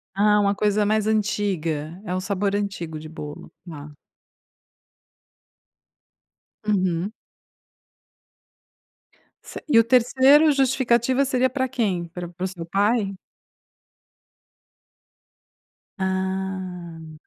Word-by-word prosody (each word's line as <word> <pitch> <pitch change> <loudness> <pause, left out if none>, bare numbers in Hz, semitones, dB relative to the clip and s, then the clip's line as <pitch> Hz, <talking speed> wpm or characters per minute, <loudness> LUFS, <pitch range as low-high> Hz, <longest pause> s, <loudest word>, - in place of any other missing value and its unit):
Ah, 210 +1 +4
uma 200 0 +2
coisa 210 0 +1
mais 215 0 +1
antiga, 185 -7 -1
é 180 - -3
um 185 - -1
sabor 200 +1 -1
antigo 175 -6 -4
de 155 0 -10
bolo, 150 -2 -9 0.2
tá. 150 -2 -9 2.7
Uhum. 190 -1 0 2.3
Cer - - -8
e 255 -6 +4
o 230 - +7
3ª, 260 +5 +5
justificativa 260 -1 +2
seria 260 -1 +1
para 260 0 -1
quem? 200 -9 -1
Para 175 +1 -7
para 175 +1 -8
o - - 0
seu 180 -3 -8
pai? 200 +3 +1 2.8
Ah. 185 -4 -4
200 Hz, 95 wpm, -23 LUFS, 175-230 Hz, 2.8 s, o